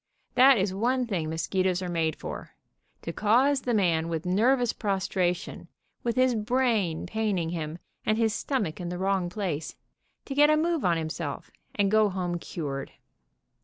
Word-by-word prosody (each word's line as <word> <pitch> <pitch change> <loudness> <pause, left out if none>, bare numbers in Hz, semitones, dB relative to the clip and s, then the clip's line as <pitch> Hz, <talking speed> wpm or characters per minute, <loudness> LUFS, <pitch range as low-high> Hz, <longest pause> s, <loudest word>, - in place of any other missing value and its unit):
That 260 +1 +7
is 190 -1 0
one 250 +5 +1
thing 175 -9 -2
mosquitoes 185 +3 0
are - - -3
made 165 -3 0
for, - - -8 0.5
to 165 - -4
cause 260 - +3
the 245 - -1
man 170 -5 +2
with 165 +1 -3
nervous 240 +6 +2
prostra 190 -3 0
tion, - - -9 0.3
with 235 -1 -1
his 255 -1 +3
brain 220 -6 0
paining 195 -4 -1
him, 160 -1 -4 0.3
and 215 0 +1
his 225 -2 +2
stomach 205 - -2
in 175 - -4
the 180 - -4
wrong 190 -1 0
place, 175 -6 -3 0.5
to 275 - -4
get 295 +2 +5
a 305 - +4
move 330 -1 0
on 175 -2 +2
himself, 155 -2 -4 0.2
and 200 -1 +2
go 215 -1 +4
home 180 -2 -2
cured. 140 -5 -5
195 Hz, 165 wpm, -27 LUFS, 170-235 Hz, 0.5 s, That